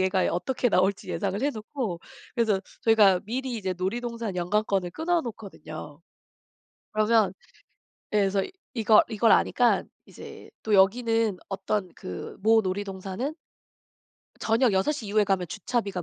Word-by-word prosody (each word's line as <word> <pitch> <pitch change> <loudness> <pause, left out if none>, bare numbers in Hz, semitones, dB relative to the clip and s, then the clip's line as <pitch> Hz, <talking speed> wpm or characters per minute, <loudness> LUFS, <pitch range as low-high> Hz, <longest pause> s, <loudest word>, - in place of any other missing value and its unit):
얘가 185 0 +2
어떻게 245 +7 0
나올지 190 +2 +1
예상을 200 0 -2
해 285 - +2
놓고 220 -6 -5 0.3
그래서 220 -5 +2 0.2
저희가 205 -5 +5
미리 250 +2 -3
이제 190 -3 -3
놀이동산 230 +1 -3
연간권을 190 0 0
끊어 335 - 0
놓거든요. 195 - -9 0.9
그러면 215 -2 +3 0.8
예 210 - +3
그래서 195 -1 +2 0.3
이걸 220 -2 +5
이걸 225 0 +3
아니까 245 -1 +3 0.3
이제 - - -11
또 215 -1 +1
여기는 225 0 +3
어떤 195 -1 -2
그 90 -1 -7
모 225 +1 +5
놀이동산은 195 +7 -4 1.1
저녁 230 0 +2
6:00 220 +5 0
이후에 210 +1 +2
가면 190 -3 0
주차비가 200 - -2
210 Hz, 290 characters per minute, -26 LUFS, 190-230 Hz, 1.1 s, 저희가